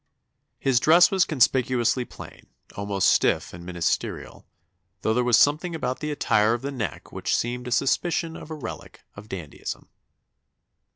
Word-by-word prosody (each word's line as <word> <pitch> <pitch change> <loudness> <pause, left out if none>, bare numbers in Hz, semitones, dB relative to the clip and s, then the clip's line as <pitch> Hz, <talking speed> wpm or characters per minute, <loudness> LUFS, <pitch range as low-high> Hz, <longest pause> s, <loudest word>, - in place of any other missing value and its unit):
His 130 -3 +2
dress 165 +7 +6
was 190 -2 +3
conspicuously 125 -3 +2
plain, - - -13 0.3
almost 100 -1 0
stiff - - +2
and 85 0 -9
ministerial; 85 -1 -3 0.5
though 110 - +1
there 125 +2 +1
was 120 -2 +4
something 155 +4 +2
about 130 -5 -3
the 150 - -4
attire 115 -6 +2
of 120 - -8
the 140 - -3
neck 120 -8 -5
which - - -1
seemed 125 +1 -3
a - - -5
suspicion 160 +6 0
of - - -10
a 160 - -5
relic 145 - -8
of 105 +1 -12
dandyism." 85 -6 -7
125 Hz, 155 wpm, -25 LUFS, 110-150 Hz, 0.5 s, dress